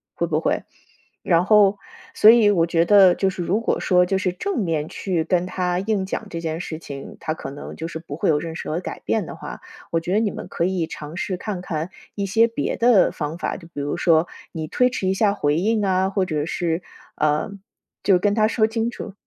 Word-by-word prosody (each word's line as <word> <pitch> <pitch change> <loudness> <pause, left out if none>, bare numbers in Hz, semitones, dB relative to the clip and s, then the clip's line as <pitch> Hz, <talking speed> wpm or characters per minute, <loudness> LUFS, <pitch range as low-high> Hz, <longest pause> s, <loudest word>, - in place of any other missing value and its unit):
会 - - 0
不 - - 0
会？ - - 0 0.6
然 170 0 +2
后， 205 -1 +5 0.4
所 215 - +8
以 225 -3 +5
我 170 -5 +3
觉 170 0 +2
得 195 -3 +7
就 195 +1 +1
是 180 -2 -4
如 190 +6 +1
果 - - 0
说 180 -1 +3
就 190 +1 +1
是 185 -2 -1
正 385 - -2
面 160 -4 -1
去 175 -5 -2
跟 175 +1 +1
他 180 -1 -1
硬 195 -1 -1
讲 - - -4
这 165 -1 -5
件 160 0 -3
事 160 -2 -5
情， 140 -3 -9
他 155 -1 -2
可 - - -7
能 140 - -8
就 165 - -5
是 160 - -6
不 150 -3 -8
会 - - +1
有 150 - +3
认 160 +1 -6
识 - - -6
和 160 +3 -1
改 - - -6
变 - - 0
的 - - -7
话， - - -8 0.3
我 165 - +2
觉 175 +3 -3
得 210 - +4
你 215 -3 0
们 - - -7
可 170 - -1
以 180 -3 -1
尝 155 +3 -8
试 185 -2 -2
看 190 -2 -4
看 165 +1 -4 0.2
一 200 - -2
些 225 +4 +4
别 230 - -3
的 230 -5 +5
方 150 +1 -4
法， - - -3
就 170 -3 -13
比 170 - -9
如 145 - -2
说 165 -1 +3 0.3
你 160 -1 -4
推 250 +9 +2
迟 195 -6 -3
一 190 - +2
下 200 +1 +2
回 145 -4 +1
应 210 +3 +1
啊， 190 0 +2
或 195 -1 0
者 150 -4 -2
是， 170 0 -1 0.4
呃， 150 +4 +1 0.5
就 190 -3 +5
跟 205 +3 +1
他 215 0 +3
说 220 -1 +2
清 225 +1 -1
楚。 215 -3 -8
180 Hz, 255 characters per minute, -22 LUFS, 165-205 Hz, 0.6 s, 所